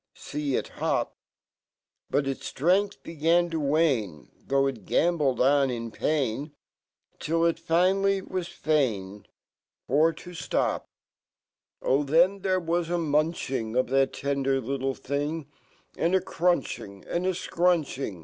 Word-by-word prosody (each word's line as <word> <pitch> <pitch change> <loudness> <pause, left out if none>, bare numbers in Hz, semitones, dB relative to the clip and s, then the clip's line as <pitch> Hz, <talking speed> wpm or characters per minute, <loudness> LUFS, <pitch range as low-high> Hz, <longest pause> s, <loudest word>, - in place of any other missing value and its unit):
See 145 -2 -3
It - - -1
hop! - - -1 0.9
But 140 - +1
its 135 -1 -4
ft 135 - -11
rengfh 200 +3 +2
began 170 +2 +1
to 165 - -1
wane,' 140 - 0 0.2
Though 135 0 +3
it 130 -7 -3
gamboled 150 -7 +2
on 135 +1 +4
in 115 -2 -4 1.3
Till 165 +2 +1
it 165 -1 +1
finally 190 +4 +2
wa 185 -1 -3 1.5
For 155 +5 +4
to 180 - -11
flop. 170 - -1 0.9
Oh! 135 +3 +3
then 170 +7 +3
there 185 -1 +1
was 170 0 -1
a - - -1
munc 155 +1 0
hi 135 0 -1
ng, 110 0 -5
Of 130 -1 +1
that 135 0 +2
tender 135 -1 0
little 135 +1 -2
thing, 145 +3 -3 0.5
And 170 +3 +1
a - - +5
crunching 170 - -1
and 175 +2 -1
a 185 - +1
(crunching. 160 - 0
155 Hz, 135 wpm, -27 LUFS, 135-175 Hz, 1.5 s, a